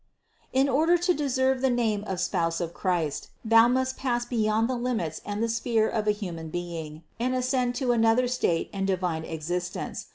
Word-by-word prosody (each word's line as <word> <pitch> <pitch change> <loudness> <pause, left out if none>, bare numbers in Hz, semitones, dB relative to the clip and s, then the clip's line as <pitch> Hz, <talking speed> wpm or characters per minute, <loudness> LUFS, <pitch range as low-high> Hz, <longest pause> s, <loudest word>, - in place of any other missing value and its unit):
In 265 +2 +3
order 315 +6 +3
to 350 +1 +2
deserve 265 -3 +1
the 265 - +3
name 225 -4 0
of 190 -2 -3
spouse 165 -2 0
of 170 -1 -3
Christ, 170 -7 -1 0.2
thou 225 +1 +6
must 260 +1 0
pass 240 -2 -1
beyond 220 -2 +1
the 255 - -1
limits 235 -11 -2
and 205 +2 -3
the - - +2
sphere 230 -1 +1
of 215 -2 -2
a - - +6
human 175 -6 -5
being 165 -2 -6 0.2
and 255 +2 0
ascend 255 -1 0
to 250 -1 +1
another 230 +1 +3
state 210 -9 0
and 195 -1 -1
divine 180 -4 -1
existence. 175 +3 -4
225 Hz, 185 wpm, -27 LUFS, 175-255 Hz, 0.2 s, thou